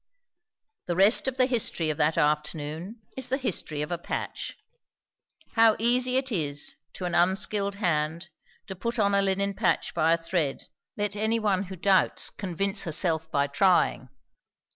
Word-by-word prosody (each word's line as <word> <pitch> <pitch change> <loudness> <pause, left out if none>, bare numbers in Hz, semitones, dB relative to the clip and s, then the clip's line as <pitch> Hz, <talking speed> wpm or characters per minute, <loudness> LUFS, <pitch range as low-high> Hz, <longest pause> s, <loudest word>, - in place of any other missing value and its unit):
The 175 - -1
rest 200 +8 +4
of 265 -1 -2
the 255 - +5
history 220 - 0
of 150 - -5
that 150 +2 +1
afternoon 150 +7 -2
is 260 -2 -3
the 265 - +1
history 165 - -3
of 150 - -6
a 175 - -2
patch. - - -5 1.0
How 225 -1 +5
easy 250 +2 +2
it 265 0 -1
is, 145 -7 -1 0.2
to 185 - -6
an 175 - -3
unskilled 195 +3 +1
hand, 170 -2 -1 0.4
to 190 - -7
put 235 +6 -3
on 200 -2 +2
a 200 - +4
linen 195 +1 0
patch 195 +2 0
by 160 +1 +2
a - - +2
thread, 165 -4 -2 0.3
let 205 -1 -1
anyone 215 -2 0
who 190 +1 -8
doubts 190 +1 +2
convince 195 +1 -1
herself 160 -2 +1
by 140 -3 +2
trying. 160 +6 +2
190 Hz, 160 wpm, -27 LUFS, 160-215 Hz, 1.0 s, the